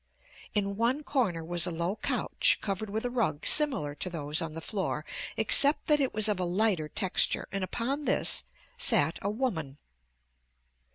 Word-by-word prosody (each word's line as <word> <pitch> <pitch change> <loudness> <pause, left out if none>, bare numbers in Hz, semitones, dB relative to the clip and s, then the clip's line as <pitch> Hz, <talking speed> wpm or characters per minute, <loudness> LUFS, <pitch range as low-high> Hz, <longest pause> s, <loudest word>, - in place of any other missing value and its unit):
In 200 -1 -2
one 245 +6 0
corner 195 - -2
was 175 +1 -1
a - - -3
low 170 +4 -3
couch - - +1
covered 200 +1 -4
with 220 +3 -4
a 245 - -3
rug 195 -12 -2
similar 265 - +3
to 180 - -4
those 150 -3 -2
on 165 -1 -5
the 165 - -6
floor 195 +4 -4 0.3
except 290 +1 +6
that 300 -1 +3
it 270 -2 0
was 215 0 +2
of 210 -3 -1
a - - -1
lighter 180 -3 0
texture, 190 +1 -1
and 195 0 -3
upon 265 +9 -3
this - - +2 0.3
sat 160 - +3
a 200 - -2
woman. 185 - -4
195 Hz, 170 wpm, -28 LUFS, 165-235 Hz, 0.3 s, except